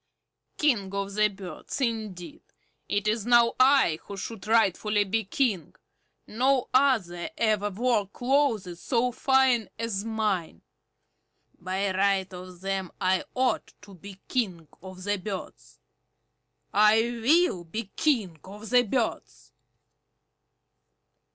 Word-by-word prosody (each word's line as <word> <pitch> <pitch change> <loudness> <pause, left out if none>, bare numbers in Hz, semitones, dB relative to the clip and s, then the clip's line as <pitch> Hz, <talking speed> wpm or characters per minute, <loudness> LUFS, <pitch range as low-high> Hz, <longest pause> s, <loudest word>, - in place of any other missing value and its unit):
King 225 -11 +1
of 200 0 -3
the 210 +1 +3
Birds, 190 - -8
indeed! 220 - -3 0.5
It 205 +1 0
is 215 0 0
now 235 -1 +5
I 260 - +4
who 200 - -8
should 210 +1 -7
rightfully 210 -1 +2
be 215 +2 -1
King. 200 - -1 0.5
No 260 +3 +1
other 225 -11 +2
ever 215 -2 +1
wore 215 0 0
clothes 230 -7 0
so 250 0 +1
fine 265 -2 +2
as 225 -4 -2
mine. 210 - -2 1.0
By 190 +2 -2
right 195 -1 +1
of 180 0 -10
them 195 -2 -3
I 185 0 +1
ought 255 0 0
to 205 -1 -13
be 195 +1 -12
King 185 - -2
of 185 0 -10
the 205 +1 0
Birds. 195 +1 -8 0.9
I 210 +2 +5 0.2
will 310 - +3
be 205 +5 -6
King 215 - 0
of 205 +3 -10
the 250 -1 +6
Birds!" 245 0 -3
210 Hz, 120 wpm, -27 LUFS, 190-240 Hz, 1.0 s, the